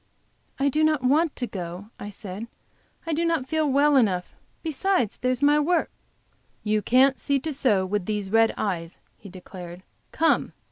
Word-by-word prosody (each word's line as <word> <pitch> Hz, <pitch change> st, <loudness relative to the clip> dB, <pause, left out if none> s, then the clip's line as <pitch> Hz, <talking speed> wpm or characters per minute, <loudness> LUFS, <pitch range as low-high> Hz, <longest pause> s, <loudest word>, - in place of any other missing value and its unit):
"I 275 Hz, -, +1 dB
do 305 Hz, +3 st, +1 dB
not 310 Hz, -4 st, +2 dB
want 300 Hz, +5 st, +2 dB
to 250 Hz, -, -3 dB
go," 185 Hz, -1 st, -7 dB
I 205 Hz, -, -6 dB
said. 205 Hz, +1 st, -7 dB, 0.6 s
"I 330 Hz, -, -2 dB
do 325 Hz, +3 st, 0 dB
not 330 Hz, -6 st, 0 dB
feel 310 Hz, 0 st, 0 dB
well 285 Hz, +2 st, +4 dB
enough. 190 Hz, -8 st, +1 dB, 0.3 s
Besides, 320 Hz, -, 0 dB
there's 255 Hz, +2 st, -1 dB
my 295 Hz, +1 st, +5 dB
work." 330 Hz, +3 st, +1 dB, 0.7 s
"You 215 Hz, 0 st, +1 dB
can't 265 Hz, +4 st, +4 dB
see 280 Hz, -1 st, 0 dB
to 315 Hz, +1 st, -3 dB
sew 215 Hz, -9 st, +2 dB
with 195 Hz, -1 st, -2 dB
these 205 Hz, -2 st, -3 dB
red 225 Hz, 0 st, +4 dB
eyes," 170 Hz, -5 st, -3 dB, 0.2 s
he 200 Hz, -, -11 dB
declared. 180 Hz, -1 st, -10 dB, 0.3 s
"Come! 325 Hz, 0 st, +1 dB
250 Hz, 170 wpm, -25 LUFS, 200-295 Hz, 0.7 s, my